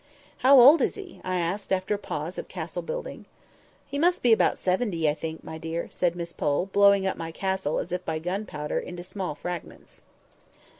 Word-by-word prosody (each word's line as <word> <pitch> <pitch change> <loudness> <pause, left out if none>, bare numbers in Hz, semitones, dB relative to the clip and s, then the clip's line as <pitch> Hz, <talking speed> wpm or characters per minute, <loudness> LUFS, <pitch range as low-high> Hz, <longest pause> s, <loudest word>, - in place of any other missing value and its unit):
"How 265 +1 +7
old 280 +5 +8
is - - +1
he?" 390 -4 -10
I 185 0 -1
asked, 180 +4 -2
after 190 +2 +1
a 205 - -2
pause 160 -1 -5
of - - -6
castle - - -5
building. - - -6 0.6
"He 280 - -4
must 350 +3 +2
be 240 -2 +6
about - - +3
seventy, 180 -4 0
I 150 - +3
think, 160 +1 -6
my 160 - -7
dear," 165 +1 -4
said 175 -1 0
Miss 170 -1 -6
Pole, 145 +4 0
blowing 200 -1 +5
up 190 - -1
my 165 0 -5
castle, 190 -3 -1
as - - -3
if 180 - -2
by 160 - -2
gun 185 +6 -3
powder, 150 0 -3
into 175 0 -7
small 185 -4 -5
fragments. 175 +1 -8
185 Hz, 200 wpm, -26 LUFS, 165-210 Hz, 0.6 s, old